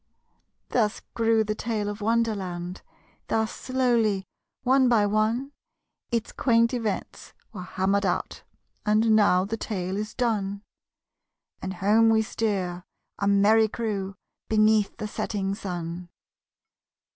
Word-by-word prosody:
Thus 215 -4 0
grew 225 -1 +3
the 215 0 -2
tale 215 -1 -2
of 205 +1 -5
Wonderland: 200 -5 -1 0.5
Thus 220 0 0
slowly, 235 -7 +1 0.4
one 260 0 +4
by 220 -4 +4
one, 220 +6 0 0.6
Its 230 -1 -1
quaint 230 -1 +2
events 225 -5 -4 0.2
were 195 - -6
hammered 190 +2 0
out 175 - -2 0.4
And 215 +1 +3
now 190 -3 +4
the 220 +3 -3
tale 190 -4 -3
is 210 0 -4
done, 205 -4 -1 1.0
And 190 +1 -4
home 215 +5 +4
we 220 0 +4
steer, 190 -6 -2 0.4
a 200 - 0
merry 210 +2 +5
crew, 200 -4 -3 0.3
Beneath 215 -1 +3
the 215 - -4
setting 195 -2 -2
sun. 175 -3 -5
215 Hz, 120 wpm, -26 LUFS, 195-225 Hz, 1.0 s, merry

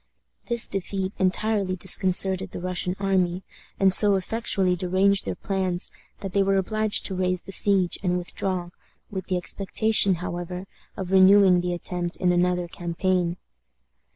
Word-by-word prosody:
This 235 -2 0
defeat 195 0 -4
entirely 190 0 0
disconcerted 190 +1 +1
the - - -8
Russian 180 0 -2
army, 190 -2 -1 0.4
and 190 -1 +5
so 205 0 +9
effectually 195 -2 -1
deranged 190 +2 +1
their - - -4
plans 190 -2 -3 0.3
that 195 -3 -6
they 200 - +2
were 195 0 +1
obliged 215 +2 0
to 195 - 0
raise 185 -1 -2
the 195 - -10
siege 190 -3 +3
and 180 -2 -1
withdraw, 180 0 -4 0.4
with 190 -2 -6
the 185 - -1
expectation, 195 +2 +1
however, 175 +1 -6 0.3
of 190 -1 -6
renewing 190 -1 +5
the 180 0 -3
attempt 175 0 -5
in 180 -2 +1
another 180 0 0
campaign. 175 +1 -2
185 Hz, 145 wpm, -24 LUFS, 180-195 Hz, 0.4 s, so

